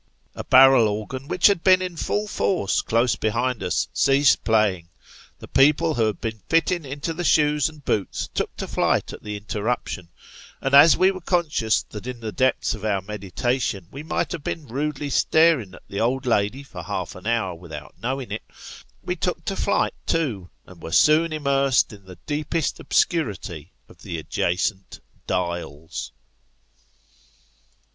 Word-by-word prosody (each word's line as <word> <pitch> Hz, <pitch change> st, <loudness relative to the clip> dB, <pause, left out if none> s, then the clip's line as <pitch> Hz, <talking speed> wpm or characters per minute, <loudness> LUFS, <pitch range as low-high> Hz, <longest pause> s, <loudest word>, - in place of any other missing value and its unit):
A -, -, -6 dB
barrel 130 Hz, -3 st, +7 dB
organ, 110 Hz, +6 st, -4 dB
which 175 Hz, -, 0 dB
had 200 Hz, -5 st, +5 dB
been 185 Hz, -1 st, +6 dB
in 180 Hz, -2 st, -4 dB
full 205 Hz, +6 st, -2 dB
force 185 Hz, -, 0 dB
close 115 Hz, +2 st, +1 dB
behind 115 Hz, +2 st, -1 dB
us, -, -, 0 dB
ceased 135 Hz, 0 st, +3 dB
playing; 100 Hz, -6 st, +1 dB, 0.5 s
the -, -, -11 dB
people 150 Hz, +4 st, +3 dB
we 120 Hz, -, +1 dB
had 110 Hz, -2 st, -2 dB
been 110 Hz, -3 st, -5 dB
fitting 165 Hz, 0 st, +2 dB
into 140 Hz, +4 st, -4 dB
the 175 Hz, +2 st, -4 dB
shoes 150 Hz, -3 st, +3 dB
and 150 Hz, -2 st, -16 dB
boots 105 Hz, -3 st, -1 dB
took -, -, -2 dB
to -, -, -4 dB
flight -, -, 0 dB
at -, -, -10 dB
the 105 Hz, -1 st, -5 dB
interruption; 105 Hz, -3 st, -3 dB, 0.5 s
and 135 Hz, -, -2 dB
as 145 Hz, +4 st, +8 dB
we 185 Hz, +1 st, +4 dB
were 185 Hz, -1 st, -8 dB
conscious 160 Hz, -, +1 dB
that 105 Hz, +2 st, -9 dB
in 125 Hz, -2 st, -6 dB
the 110 Hz, -2 st, -5 dB
depth 130 Hz, +6 st, +1 dB
of 110 Hz, -3 st, -8 dB
our 100 Hz, -3 st, 0 dB
meditations 105 Hz, 0 st, -3 dB
we 140 Hz, -, -7 dB
might 155 Hz, -, -2 dB
have 165 Hz, -, -5 dB
been 155 Hz, 0 st, -4 dB
rudely 140 Hz, +3 st, -3 dB
staring 155 Hz, -, +3 dB
at -, -, -16 dB
the 100 Hz, -, -5 dB
old 130 Hz, +4 st, 0 dB
lady 115 Hz, +3 st, 0 dB
for 100 Hz, -10 st, -9 dB
half 80 Hz, -, -4 dB
an 90 Hz, +3 st, -10 dB
hour 115 Hz, -6 st, 0 dB
without 80 Hz, -4 st, -10 dB
knowing 130 Hz, +1 st, -3 dB
it, -, -, -3 dB, 0.6 s
wo -, -, -2 dB
took -, -, -3 dB
to -, -, -2 dB
flight -, -, +1 dB
too, 115 Hz, -, -1 dB, 0.2 s
and 90 Hz, -2 st, -15 dB
were 80 Hz, -, -7 dB
soon 155 Hz, -, +4 dB
immersed 140 Hz, -5 st, +1 dB
in 100 Hz, -2 st, -14 dB
the 90 Hz, -1 st, -12 dB
deepest 155 Hz, +1 st, -2 dB
obscurity 95 Hz, -, -1 dB, 0.2 s
of -, -, -19 dB
the 85 Hz, -, -5 dB
adjacent 90 Hz, +5 st, -2 dB
" -, -, -35 dB
Dials." 85 Hz, -4 st, -4 dB
125 Hz, 170 wpm, -23 LUFS, 100-150 Hz, 0.6 s, as